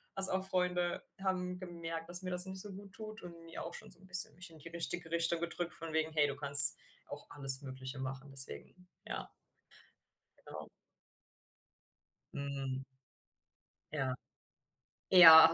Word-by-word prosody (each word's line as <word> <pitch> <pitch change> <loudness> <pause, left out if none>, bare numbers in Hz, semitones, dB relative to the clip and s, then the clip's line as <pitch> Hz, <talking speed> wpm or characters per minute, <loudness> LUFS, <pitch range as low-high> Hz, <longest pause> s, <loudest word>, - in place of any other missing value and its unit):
als 195 0 +6
auch 190 0 -8
Freunde 180 -1 -8 0.2
haben 180 -1 -9
gemerkt, 165 -2 -14
dass 175 +1 -7
mir 185 - -11
das 180 +1 +5
nicht 190 0 -11
so 205 0 -16
guttut, 210 +3 -16
und 170 -1 -18
mir 165 - -15
auch 170 +1 -14
schon - - -14
so - - -7
'n 190 - -24
bisschen 180 -4 -1
mich 185 0 -14
in 160 - -22
die 165 - -18
richtige 170 0 -11
Richtung 170 0 -6
gedrückt 170 0 -10
von 165 -1 -12
wegen: 160 0 -7
„Hey, 150 -2 -4
du 140 - -11
kannst 140 0 +9 0.3
auch - - -16
alles 135 -2 +5
Mögliche 130 0 -15
machen.“ 135 +1 -13
Deswegen 145 +7 -6 0.2
ja. - - -13 1.2
Genau. - - -16 1.7
Mhm. 135 -2 -11 1.1
Ja. 135 -4 -9 0.9
Ja. 160 -3 +3
165 Hz, 150 wpm, -27 LUFS, 145-180 Hz, 1.7 s, kannst